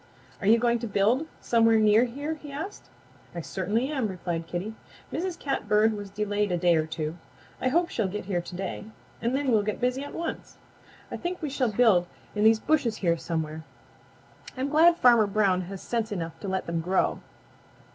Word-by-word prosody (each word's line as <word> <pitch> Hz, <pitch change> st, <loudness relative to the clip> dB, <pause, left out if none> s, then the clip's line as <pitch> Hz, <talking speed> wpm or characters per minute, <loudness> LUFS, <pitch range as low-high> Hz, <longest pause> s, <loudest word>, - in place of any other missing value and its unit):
"Are 195 Hz, -, -3 dB
you 225 Hz, +2 st, +7 dB
going 235 Hz, 0 st, +2 dB
to 235 Hz, -, -4 dB
build 220 Hz, +9 st, +2 dB
somewhere 225 Hz, -1 st, +4 dB
near 215 Hz, +2 st, +5 dB
here?" 285 Hz, +6 st, -4 dB
he 295 Hz, -2 st, -10 dB
asked. 320 Hz, +9 st, -7 dB, 0.5 s
"I 170 Hz, -, -3 dB
certainly 205 Hz, -, -1 dB
am," 265 Hz, -7 st, -1 dB
replied 175 Hz, -3 st, -4 dB
Kitty. 185 Hz, +5 st, -4 dB, 0.4 s
"Mrs. 355 Hz, +1 st, -2 dB
Catbird 220 Hz, -5 st, +1 dB
was 205 Hz, -1 st, -6 dB
delayed 205 Hz, 0 st, -1 dB
a 175 Hz, -, +1 dB
day 175 Hz, 0 st, +3 dB
or 155 Hz, -1 st, +1 dB
two. 160 Hz, +1 st, -4 dB, 0.4 s
I -, -, +1 dB
hope 340 Hz, +6 st, +2 dB
she'll 220 Hz, -4 st, -1 dB
get 205 Hz, +1 st, -5 dB
here 180 Hz, -3 st, -1 dB
to 175 Hz, -, -9 dB
day 190 Hz, +2 st, -4 dB, 0.4 s
and 235 Hz, +3 st, 0 dB
then 275 Hz, -2 st, 0 dB
we'll 220 Hz, -2 st, +4 dB
get 210 Hz, 0 st, -3 dB
busy 250 Hz, +2 st, 0 dB
at 285 Hz, -, -8 dB
once. 335 Hz, 0 st, -5 dB, 0.5 s
I -, -, -3 dB
think 355 Hz, +1 st, -4 dB
we 300 Hz, -4 st, -4 dB
shall 255 Hz, -4 st, 0 dB
build 205 Hz, -6 st, +4 dB, 0.3 s
in 210 Hz, -, 0 dB
these 220 Hz, 0 st, +6 dB
bushes 255 Hz, -6 st, +1 dB
here 170 Hz, -1 st, +4 dB
somewhere. 160 Hz, -1 st, -4 dB, 0.9 s
I'm 265 Hz, +2 st, -1 dB
glad 330 Hz, +3 st, +5 dB
Farmer 235 Hz, -6 st, +5 dB
Brown 195 Hz, -3 st, +2 dB
has 195 Hz, -1 st, -7 dB
sense 230 Hz, -2 st, -2 dB
enough 165 Hz, -5 st, -3 dB
to -, -, -6 dB
let 190 Hz, -1 st, -1 dB
them 170 Hz, -1 st, -2 dB
grow. 185 Hz, +3 st, +1 dB
215 Hz, 195 wpm, -27 LUFS, 185-255 Hz, 0.9 s, you